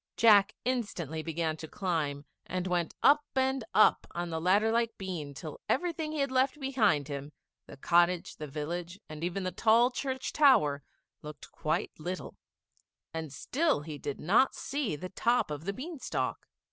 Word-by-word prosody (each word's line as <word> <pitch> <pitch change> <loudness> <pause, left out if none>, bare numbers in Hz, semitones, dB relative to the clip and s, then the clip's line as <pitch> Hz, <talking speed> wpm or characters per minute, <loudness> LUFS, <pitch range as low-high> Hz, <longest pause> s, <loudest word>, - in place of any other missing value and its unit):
Jack 210 -2 +6
instantly 195 - -2
began 165 0 -2
to 160 - -8
climb, 150 -6 -2 0.2
and 185 0 -2
went 175 -3 -1
up 295 +1 +6
and 265 -1 +1
up 215 - +5
on 175 0 -3
the 160 0 -2
ladder 200 +6 +3
like 230 0 0
bean 175 -7 -5
till 155 +1 -8
every 345 +5 +1
thing 315 -2 -4
he 310 - -4
had 275 -1 0
left 260 +3 +1
behind 215 - +2
him, 140 0 -6 0.4
the - - -11
cottage, 175 +4 +2
the 150 - -6
village, 170 +6 -5
and 155 +1 -8
even 180 +3 -2
the 185 - -2
tall 230 +6 +4
church 260 0 -3
tower, 155 - +4 0.4
looked 150 0 -10
quite 155 - -1
little, 180 +4 -5 0.8
and 160 -3 -5
still 290 - 0
he 150 -1 -7
did 145 0 -5
not 210 +11 +3
see 275 - -2
the 185 +5 -7
top 235 -2 +1
of 150 +2 -5
the 200 - -1
bean 305 - -7
stalk. - - -3
185 Hz, 170 wpm, -30 LUFS, 155-250 Hz, 0.8 s, Jack